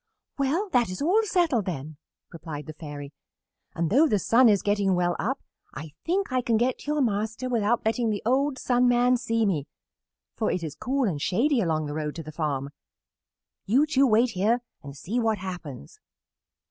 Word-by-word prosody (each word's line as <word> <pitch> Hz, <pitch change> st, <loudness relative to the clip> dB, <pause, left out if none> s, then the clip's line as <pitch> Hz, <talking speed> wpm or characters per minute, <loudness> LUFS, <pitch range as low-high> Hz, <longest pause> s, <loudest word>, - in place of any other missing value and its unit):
"Well, 305 Hz, +10 st, +1 dB
that 240 Hz, -, +2 dB
is 185 Hz, -, -5 dB
all 360 Hz, +10 st, +3 dB
settled, 340 Hz, -, +1 dB
then," 155 Hz, -3 st, -5 dB, 0.4 s
replied 155 Hz, -3 st, -7 dB
the 155 Hz, -, -8 dB
Fairy, 145 Hz, -2 st, -8 dB, 0.6 s
"and 170 Hz, 0 st, -1 dB
though 290 Hz, +8 st, +5 dB
the 215 Hz, -, +2 dB
sun 230 Hz, +5 st, +4 dB
is 200 Hz, -3 st, +2 dB
getting 200 Hz, -2 st, +1 dB
well 175 Hz, -1 st, +1 dB
up 260 Hz, +7 st, -2 dB, 0.3 s
I 155 Hz, 0 st, -7 dB
think 375 Hz, -4 st, 0 dB
I 255 Hz, -, +2 dB
can 235 Hz, -2 st, +1 dB
get 245 Hz, +2 st, 0 dB
to -, -, -13 dB
your 300 Hz, -, +1 dB
master 220 Hz, +1 st, -1 dB
without 230 Hz, -2 st, 0 dB
letting 225 Hz, +1 st, +1 dB
the 210 Hz, -1 st, -2 dB
old 270 Hz, +3 st, +1 dB
Sun 250 Hz, -1 st, +2 dB
Man 245 Hz, +1 st, +4 dB
see 230 Hz, -2 st, 0 dB
me, 160 Hz, -8 st, -1 dB, 0.7 s
for 220 Hz, -, 0 dB
it 180 Hz, -, -2 dB
is 155 Hz, -3 st, -4 dB
cool 270 Hz, +2 st, -1 dB
and 155 Hz, -7 st, -3 dB
shady 245 Hz, -, +2 dB
along 160 Hz, -4 st, 0 dB
the 145 Hz, -, -5 dB
road 150 Hz, -1 st, -3 dB
to 165 Hz, -, -6 dB
the 155 Hz, -, -8 dB
farm. 140 Hz, -3 st, -3 dB, 1.0 s
You 260 Hz, +9 st, +4 dB
two 275 Hz, -3 st, +3 dB
wait 230 Hz, +2 st, +3 dB
here 220 Hz, +5 st, +1 dB, 0.2 s
and 140 Hz, -1 st, -10 dB
see 215 Hz, -, -2 dB
what 225 Hz, -2 st, +1 dB
happens." 180 Hz, -, -8 dB
220 Hz, 190 wpm, -26 LUFS, 165-255 Hz, 1.0 s, though